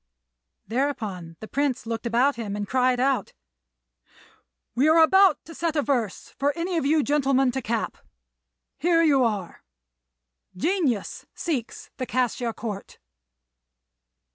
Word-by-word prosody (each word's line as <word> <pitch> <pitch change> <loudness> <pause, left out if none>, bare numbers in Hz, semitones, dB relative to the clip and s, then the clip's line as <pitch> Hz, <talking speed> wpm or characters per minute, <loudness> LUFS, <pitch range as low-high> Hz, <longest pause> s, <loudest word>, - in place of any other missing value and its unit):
Thereupon 215 -9 -3
the 220 - -7
Prince 280 -1 -1
looked 230 +1 -3
about 250 +5 +2
him 210 -4 -4
and 205 -1 -3
cried 255 0 +2
out, 265 0 0 1.4
"We 260 +6 +3
are 315 +1 +5
about 380 +4 +5
to 330 - -11
set 330 -1 -2
a 295 - +2
verse 240 -9 -2
for 285 +1 +2
any 350 +2 -2
of 280 - 0
you 305 0 +3
gentlemen 270 -2 +2
to 265 +2 -3
cap; 230 -1 -2 0.8
here 330 +2 +3
you 280 -5 +4
are: 205 -7 -2 0.9
'Genius 290 - -1
seeks 270 -10 -4
the 255 - -4
Cassia 245 -1 0
Court. 215 -3 -7
260 Hz, 130 wpm, -25 LUFS, 230-295 Hz, 1.4 s, are